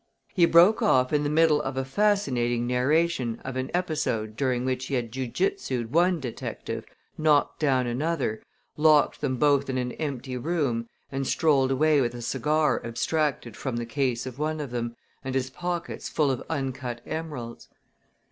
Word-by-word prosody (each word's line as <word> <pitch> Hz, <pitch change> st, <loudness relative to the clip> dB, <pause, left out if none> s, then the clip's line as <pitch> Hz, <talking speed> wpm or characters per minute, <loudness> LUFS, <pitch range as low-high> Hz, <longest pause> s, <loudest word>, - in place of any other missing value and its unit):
He 175 Hz, -3 st, +5 dB
broke 175 Hz, +9 st, +6 dB
off 130 Hz, -, +3 dB
in 150 Hz, 0 st, +2 dB
the 145 Hz, -, 0 dB
middle 155 Hz, -1 st, +4 dB
of 135 Hz, 0 st, -4 dB
a 135 Hz, -, -1 dB
fascinating 135 Hz, -, +1 dB
narration 125 Hz, 0 st, +1 dB
of 130 Hz, -1 st, -4 dB
an 130 Hz, 0 st, -2 dB
episode 150 Hz, -11 st, -1 dB
during 125 Hz, 0 st, 0 dB
which 130 Hz, 0 st, -2 dB
he 140 Hz, -, -1 dB
had 120 Hz, -3 st, -2 dB
ju 130 Hz, +1 st, -3 dB
jutsued 130 Hz, -, -1 dB
one 175 Hz, +2 st, +3 dB
detective, 125 Hz, -5 st, -5 dB, 0.3 s
knocked 155 Hz, -1 st, +2 dB
another 130 Hz, -1 st, 0 dB
down, -, -, -24 dB, 0.3 s
locked 150 Hz, -1 st, +4 dB
them 130 Hz, -3 st, -1 dB
both 140 Hz, 0 st, +3 dB
in 130 Hz, -, -1 dB
an 125 Hz, -1 st, -1 dB
empty 130 Hz, -4 st, -4 dB
room, 125 Hz, -5 st, -1 dB, 0.2 s
and 135 Hz, -1 st, -2 dB
strolled 140 Hz, -5 st, +3 dB
away 150 Hz, +2 st, +3 dB
with 120 Hz, -1 st, -1 dB
a 120 Hz, -, -6 dB
cigar 150 Hz, +5 st, +1 dB
abstracted 125 Hz, -1 st, -1 dB
from 130 Hz, +1 st, -4 dB
the 120 Hz, -, -2 dB
case 125 Hz, 0 st, -1 dB
of 130 Hz, +1 st, -7 dB
one 155 Hz, +1 st, -1 dB
of 145 Hz, -4 st, -5 dB
them 120 Hz, -1 st, -3 dB, 0.3 s
and 135 Hz, -1 st, -4 dB
his 130 Hz, 0 st, -1 dB
pockets 175 Hz, +2 st, -4 dB
full 150 Hz, -3 st, +2 dB
of 130 Hz, -, -3 dB
uncut 130 Hz, -5 st, -3 dB
emeralds. 150 Hz, -7 st, -6 dB
135 Hz, 170 wpm, -26 LUFS, 125-155 Hz, 0.3 s, broke